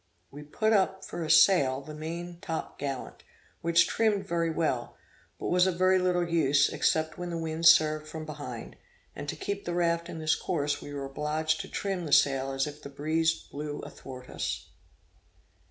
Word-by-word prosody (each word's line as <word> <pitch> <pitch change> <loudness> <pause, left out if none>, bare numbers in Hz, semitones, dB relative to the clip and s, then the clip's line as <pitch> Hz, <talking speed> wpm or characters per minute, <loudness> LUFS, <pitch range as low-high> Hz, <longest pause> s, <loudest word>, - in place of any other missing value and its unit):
We 145 - -9
put 215 +9 0
up 190 -2 +1
for 170 - -5
a 155 - -4
sail 155 -5 +5
the 155 +2 -9
main 170 +3 -6
top 165 -1 -5
gallant, 140 -2 -5 0.4
which 170 0 +4
trimmed 215 -3 +1
very 170 -1 0
well, 155 -7 -1 0.4
but - - -4
was 180 +1 +4
of 180 -2 -1
very 185 +1 +4
little 180 -1 +1
use, 145 -4 +3
except 160 +1 0
when 175 0 -4
the 170 - -3
wind 165 0 +1
served 155 -1 +5
from 155 0 -6
behind; 145 -6 -7 0.4
and 145 0 -6
to - - -3
keep 200 0 -4
the 175 - -2
raft 170 -1 +1
in - - -6
this 155 0 +2
course, 145 -5 -1
we 145 - -8
were 140 -1 -4
obliged 150 +5 -1
to 195 - -8
trim 190 -3 -3
the 145 - -1
sail 135 -1 +4
as 135 0 0
if 150 0 -8
the 140 - -8
breeze 160 +3 0
blew 145 0 -5
athwart 130 -1 -10
us. - - -4
160 Hz, 185 wpm, -29 LUFS, 145-175 Hz, 0.4 s, sail